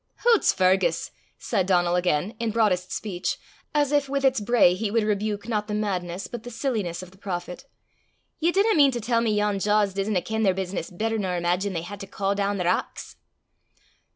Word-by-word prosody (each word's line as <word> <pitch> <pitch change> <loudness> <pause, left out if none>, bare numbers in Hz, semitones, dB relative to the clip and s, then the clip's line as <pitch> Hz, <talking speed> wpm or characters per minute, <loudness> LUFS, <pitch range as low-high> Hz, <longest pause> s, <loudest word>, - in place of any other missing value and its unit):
"Hoots, 470 -3 +5
Fergus!" 185 -2 +1 0.3
said 185 -2 -1
Donal 175 -2 +3
again, 180 +2 0
in 230 -1 -1
broadest 195 -5 +1
speech, 190 -3 -3 0.3
as 295 -2 +1
if 290 -2 +2
with 275 0 0
its 265 -2 +3
bray 210 -4 +4
he 205 +3 -2
would 225 +1 +1
rebuke 210 0 -1
not 210 -3 -1
the 210 - -2
madness 185 -3 -2
but 240 - -7
the 245 - -8
silliness 220 -8 -2
of 185 - -12
the 190 - -21
prophet, 180 +4 -5 0.7
"ye 335 +2 +2
dinna 405 +4 +3
mean 285 -5 +6
to 240 - -2
tell 230 +1 +1
me 230 - +1
yon 210 -1 +1
jaws 205 -1 +2
(billows) 195 +1 -2
disna 185 -5 0
ken 220 0 -2
their 190 -4 +3
business 185 -2 -3
better 220 +5 -2
nor 185 -3 -1
imaigine 180 +3 0
they 165 -1 -3
hae 200 +4 -7
to 195 0 -8
caw 195 0 -1
doon 200 0 -1
the 180 - -2
rocks?" 180 +2 -2
205 Hz, 205 wpm, -25 LUFS, 185-225 Hz, 0.7 s, mean